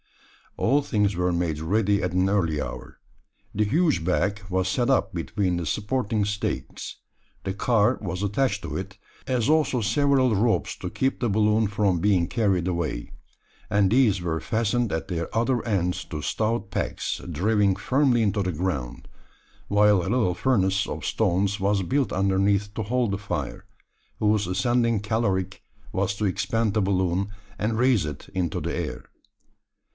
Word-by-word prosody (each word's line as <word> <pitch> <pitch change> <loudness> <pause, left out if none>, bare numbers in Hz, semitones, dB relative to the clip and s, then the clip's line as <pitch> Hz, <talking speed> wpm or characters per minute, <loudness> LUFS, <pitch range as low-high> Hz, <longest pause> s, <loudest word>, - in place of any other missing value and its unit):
All 140 +5 +3
things 105 -7 0
were 90 +1 +1
made 85 -3 -1
ready 100 +5 +1
at 90 - 0
an 90 +1 +2
early 85 -7 +1
hour. - - -7 0.5
The 105 - +1
huge 150 - +2
bag 95 +4 0
was 95 0 0
set 120 +6 0
up 135 - +2
between 90 +2 -1
the 85 - -3
supporting 105 - -1
stakes 105 0 -4 0.5
the 95 - -2
car 115 +3 +2
was 90 -2 -4
attached 105 +1 0
to - - -5
it, 95 +1 -5 0.3
as 125 -3 +1
also 150 -4 +2
several 130 +2 +2
ropes 110 +3 +1
to 90 - -5
keep 130 +8 -1
the 120 - 0
balloon 105 +1 +3
from 100 -3 +1
being 90 -2 +2
carried 95 -7 +1
away; 85 -9 -2 0.6
and 100 -2 +3
these 110 -7 +3
were 80 -2 -1
fastened 115 0 0
at 80 - -2
their 85 -3 -4
other 120 +2 +1
ends 90 -5 0
to 75 -2 -6
stout 110 -1 -1
pegs, - - -2
driven 100 +4 +2
firmly 125 +3 +2
into 100 -1 +1
the 95 -1 -1
ground; 75 -8 -3 0.6
while 105 -1 +4
a 85 - -3
little 110 -6 +2
furnace 95 -3 +1
of - - -5
stones 95 +3 +1
was 100 0 +1
built 135 +7 0
underneath 100 +1 +1
to 110 - -3
hold 120 0 0
the 100 - -2
fire, 100 - -4 0.5
whose 105 -1 +2
ascending 115 +4 +1
caloric 100 -3 -1 0.3
was 100 0 0
to 105 - -2
expand 100 +3 0
the 110 - +2
balloon, 95 0 0 0.3
and 110 +1 0
raise 125 -5 +3
it 75 -1 -7
into 90 -3 -1
the - - -3
air. - - -4
100 Hz, 160 wpm, -25 LUFS, 95-115 Hz, 0.6 s, while